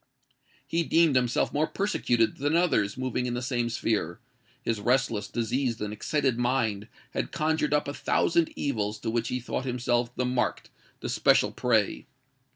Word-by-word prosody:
He 165 +4 0
deemed 165 -3 +3
himself 125 -1 +1
more 155 +2 +1
persecuted 125 - 0
than 145 +3 0
others 140 - +2
moving 130 -1 -1
in 120 - -2
the 120 - -2
same 120 -2 -1
sphere: 105 -7 -1 0.4
his 115 -3 -1
restless, 110 -2 +1
diseased, 120 +2 -1
and 105 0 -3
excited 130 +2 0
mind, 120 -4 0 0.2
had - - -3
conjured 155 -1 0
up 150 -1 +2
a 140 - -3
thousand 170 +2 +1
evils 105 -6 -2
to 115 - -2
which 115 0 0
he 125 - -2
thought 125 +2 -4
himself 120 -1 0
the 125 - 0
marked—the 125 -3 -3
special - - +3
prey. 110 -5 0
125 Hz, 160 wpm, -27 LUFS, 115-140 Hz, 0.4 s, deemed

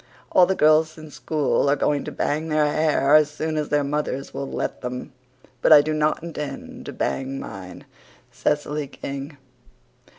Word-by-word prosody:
All 180 -1 +6
the 190 - +1
girls 155 0 +4
in 155 -1 -11
school 145 -1 0
are 140 - +4
going 145 0 0
to - - -5
bang 155 +2 -1
their 155 -1 +3
hair 150 -1 +2
as 155 -1 +6
soon 155 +1 -3
as 150 -1 -2
their 145 -1 +2
mothers 140 -1 -3
will 140 - -4
let - - -3
them. 125 +2 -6 0.5
But - - +3
I 150 -2 +10
do 155 - -1
not 155 +1 0
intend 150 -5 -7
to - - -4
bang 135 0 -2
mine. 95 -2 -9 0.5
CECILY 150 0 -1
KING. 140 +2 -7
150 Hz, 170 wpm, -23 LUFS, 140-155 Hz, 0.5 s, I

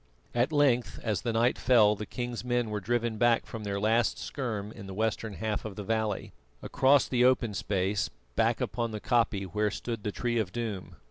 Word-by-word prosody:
At 120 +5 +1
length 135 -6 +2
as 110 -3 -1
the 120 - -1
night 115 +2 +2
fell 110 -4 +5
the 105 0 -6
king's 120 +1 -4
men 120 -2 0
were 105 - -1
driven 115 +2 -1
back 120 -1 +3
from 115 -2 -7
their 100 -1 -2
last 110 +3 +2
scherm 110 -7 -4
in 100 -3 -10
the 95 - -7
western 110 0 -1
half 110 0 -2
of 110 -3 -6
the 105 - -5
valley, 110 -2 -2 0.3
across 135 0 +4
the 125 -1 +2
open 125 -4 +3
space 100 -1 -1 0.3
back - - +2
upon 120 -1 -2
the 110 -1 -5
koppie 115 -4 +1
where 105 +3 0
stood 115 +1 -5
the 105 - -2
Tree 120 +2 -1
of 100 -5 -2
Doom. 110 -5 -4
110 Hz, 200 wpm, -29 LUFS, 105-120 Hz, 0.3 s, fell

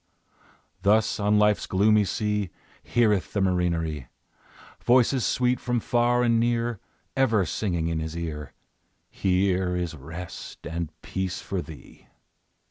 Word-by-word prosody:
Thus, 110 +2 +3
on 105 +1 +3
Life's 105 0 +3
gloomy 105 +2 +4
sea, 105 -1 -1 0.3
Heareth 105 -5 +1
the 100 - 0
marinere 85 -7 0 0.8
Voices 125 +1 +4
sweet, 125 0 +1
from 120 -1 0
far 120 +1 +2
and 115 -1 +3
near, 120 -2 0 0.4
Ever 115 -7 +3
singing 85 -2 -1
in 80 -1 -1
his 80 +1 -4
ear, 75 -4 -5 0.6
"Here 95 -1 +1
is 90 -2 -2
rest 80 +5 -9
and 85 -1 -3
peace 95 -1 -3
for 95 -2 -3
thee." 80 -6 -13
100 Hz, 125 wpm, -26 LUFS, 85-115 Hz, 0.8 s, gloomy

